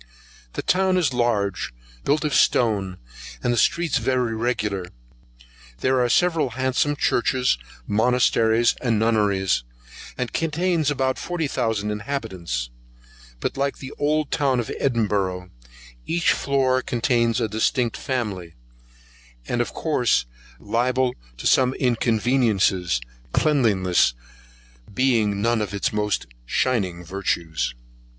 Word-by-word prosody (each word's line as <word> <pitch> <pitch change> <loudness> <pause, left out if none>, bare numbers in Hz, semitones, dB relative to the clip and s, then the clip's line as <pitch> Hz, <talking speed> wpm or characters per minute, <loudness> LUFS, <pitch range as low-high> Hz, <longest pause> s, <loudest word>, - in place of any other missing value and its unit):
The - - -4
town 185 0 +2
is 160 -7 +1
large, 115 - 0 0.3
built 150 +2 +1
of 150 - -1
stone, 100 -6 +2 0.5
and 120 - +2
the - - 0
streets 160 +2 +2
very 125 -1 0
regular; 110 -5 -1 1.0
there 130 0 +2
are 120 - +1
several 165 -1 +2
handsome 130 +3 +1
churches, 125 - +1 0.3
monasteries, 115 - +3
and 115 -3 +1
nunneries, 105 - +1 0.5
and 125 -2 -3
contains 165 -1 0
about 130 -2 0
forty 175 -2 -2
thousand 115 -5 -1
inhabitants; 95 - -4 0.7
but, - - -3
like 140 0 -1
the 135 0 -8
old 150 0 +1
town 135 -4 +1
of 115 - -3
Edinburgh, 100 -7 0 0.6
each 170 +1 +2
floor 130 -2 +1
contains 120 -1 +1
a 115 - 0
distinct 115 +3 0
family, 105 - -4 0.9
and 120 - 0
of 120 - -2
course 125 - +1 0.3
liable 125 +3 0 0.2
to - - -9
the - - +4
same 130 0 +3
inconveniencies, 110 - +1 0.3
cleanliness 100 - +2 0.8
being 105 -4 +1
none 115 -1 +2
of 100 -1 -3
its 100 - -1
most 105 - 0 0.2
shining 95 - 0
virtues. 85 -7 -2
120 Hz, 115 wpm, -23 LUFS, 105-130 Hz, 1.0 s, the